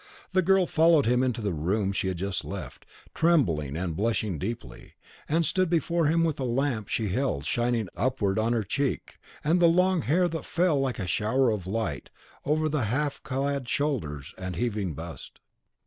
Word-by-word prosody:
The 185 0 +3
girl 190 +1 +4
followed 160 -2 +4
him 125 +2 +3
into 125 -3 0
the 100 -3 0
room 95 +6 0
she 100 - -1
had 95 -2 -2
just 95 0 -2
left, - - -8 0.3
trembling 85 - +2
and 85 -2 -2
blushing 105 -4 -1
deeply, 115 +6 -6 0.3
and 165 +2 +2
stood 185 +1 +1
before 170 -1 +1
him 165 +2 +3
with 160 -3 0
the 135 - -3
lamp 125 -3 -1
she 110 -3 -1
held 100 - -1
shining 120 -3 0
upward 115 -6 0
on 115 +2 +1
her 115 -2 +1
cheek 135 +8 -2 0.2
and 165 +4 +3
the 170 - +6
long 180 +1 +3
hair 175 +6 +2
that 160 -1 -4
fell 170 -4 +1
like 130 -4 -1
a 95 - -3
shower 115 +8 +2
of 100 -4 -3
light 95 -8 -3 0.4
over 155 +2 +1
the 150 -6 0
half 140 +6 -1
clad 135 -1 -2
shoulders 85 - -2
and 95 -1 -4
heaving 100 -5 -2
bust. 80 +2 -9
125 Hz, 180 wpm, -27 LUFS, 100-155 Hz, 0.4 s, the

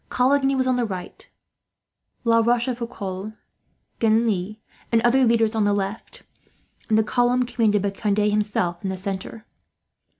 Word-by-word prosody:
Coligny 270 +2 +2
was 260 -1 +1
on 255 -1 +1
the 245 - +1
right; 185 -5 -7 0.9
La 230 -1 +4
Rochefoucauld, 230 -4 -2 0.6
Genlis, 215 -3 +1 0.3
and 230 - +4
other 260 +2 +4
leaders 230 -1 +2
on 220 -1 +1
the 205 0 +2
left; 200 +2 -5 0.7
and 215 - +3
the 220 - +4
column 245 +2 +1
commanded 215 -4 +1
by 200 - 0
Conde, 205 0 -1
himself, 210 -4 0
in 195 - -2
the 190 - -3
centre. 195 +3 -5
220 Hz, 140 wpm, -23 LUFS, 205-240 Hz, 0.9 s, La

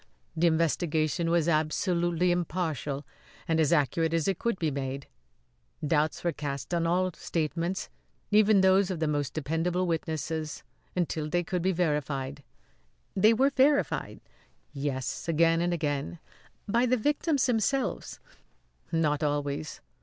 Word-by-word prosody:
"The 170 +2 +3
investigation 165 0 +1
was 170 -1 +2
absolutely 170 +2 +1
impartial 160 -5 -2 0.4
and 160 -1 +1
as 155 -3 +3
accurate 160 +2 +2
as 165 +1 0
it 195 -3 0
could 235 -4 -1
be 160 -4 0
made. 135 0 -4 0.8
Doubts 150 +1 +1
were 170 - +1
cast 145 +1 -5
on 170 -1 +1
all 185 +2 +1
statements 165 +4 -2 0.4
even 210 -1 +5
those 190 0 +4
of 185 -4 -3
the 160 - 0
most 145 -3 -1
dependable 165 +4 0
witnesses 160 -2 -3 0.3
until 160 -3 -1
they 175 +2 +1
could 180 +1 -2
be 190 +2 +2
verified." 145 -5 -1 0.7
"They 215 +4 +5
were 270 +4 +3
verified?" 280 +2 +1 0.5
"Yes; 135 -2 -3
again 165 +1 +3
and 175 0 +1
again." 145 - -2 0.5
"By 235 +4 +2
the 255 +1 +3
victims 290 +2 +1
themselves?" 250 +2 -1 0.7
"Not 155 -3 +1
always. 145 0 -2
165 Hz, 130 wpm, -28 LUFS, 150-180 Hz, 0.8 s, even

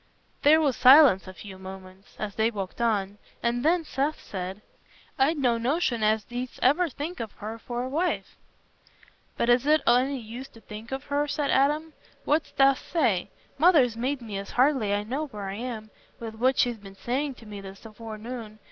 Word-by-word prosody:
There 310 +2 +6
was 285 -6 +1
silence 260 -8 +7
a 185 - -8
few 190 -2 -10
moments 190 0 -11
as 210 -1 -4
they 220 +2 +2
walked 200 -1 -6
on, 205 -3 0 0.2
and 240 +1 0
then 335 +2 +3
Seth 290 +2 -1
said, 190 +2 -6 0.6
"I'd 295 +5 +3
no 245 -4 +2
notion 250 -1 0
as 215 0 +2
thee'dst 245 +1 -6
ever 310 +7 +4
think 295 +4 -6
of 225 -3 -5
her 220 +2 -7
for 240 +1 -4
a - - -3
wife." 325 +7 -2 1.0
"But 235 - 0
is 245 +3 +3
it 305 0 +5
o' 240 - +6
any 270 +2 0
use 240 +4 -8
to 225 - -14
think 220 +3 -10
of 265 +1 -4
her?" 290 +1 -1
said 290 0 -1
Adam. 300 +4 +2 0.3
"What 305 +2 +1
dost 270 -1 +4
say? 230 - +1 0.3
Mother's 295 -8 +5
made 255 +2 -2
me 205 -3 -5
as 200 - -8
I - - -13
hardly 245 -7 +2
know 270 +8 -3
where 210 -7 -7
I 195 +1 -5
am, 225 -3 -6 0.3
with 225 -1 -6
what 255 +4 +1
she's 240 -2 +1
been 195 -1 -12
saying 265 +6 -2
to 230 - -15
me 205 -2 -8
this 195 0 -11
forenoon. 225 0 -8
240 Hz, 190 wpm, -26 LUFS, 215-280 Hz, 1.0 s, silence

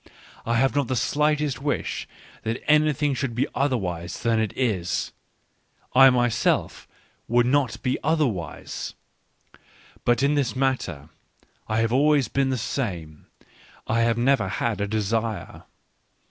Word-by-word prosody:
I 115 - +1
have 135 +4 +2
not 140 -3 +1
the 130 - -1
slightest 150 +1 0
wish 145 0 -2 0.3
that 115 +2 -3
anything 150 -1 +3
should 130 -2 -3
be 125 - +1
otherwise 95 -11 -2
than 115 -1 +2
it 110 -2 0
is: 100 -9 -1 0.8
I 135 +1 +8
myself 120 -2 +1 0.4
would 120 +1 +3
not 135 -1 +1
be 130 -1 0
otherwise.... 140 - -2 1.1
But 120 +3 +2
in 140 +1 +3
this 140 -4 0
matter 120 - -1 0.6
I 110 +1 +1
have 115 +1 0
always 145 -2 +3
been 135 -1 +1
the 130 - 0
same. 90 - -4 0.6
I 115 +1 +1
have 115 0 +2
never 120 -4 +2
had 105 +2 -2
a 100 - 0
desire. 110 +1 -2
120 Hz, 130 wpm, -24 LUFS, 110-140 Hz, 1.1 s, I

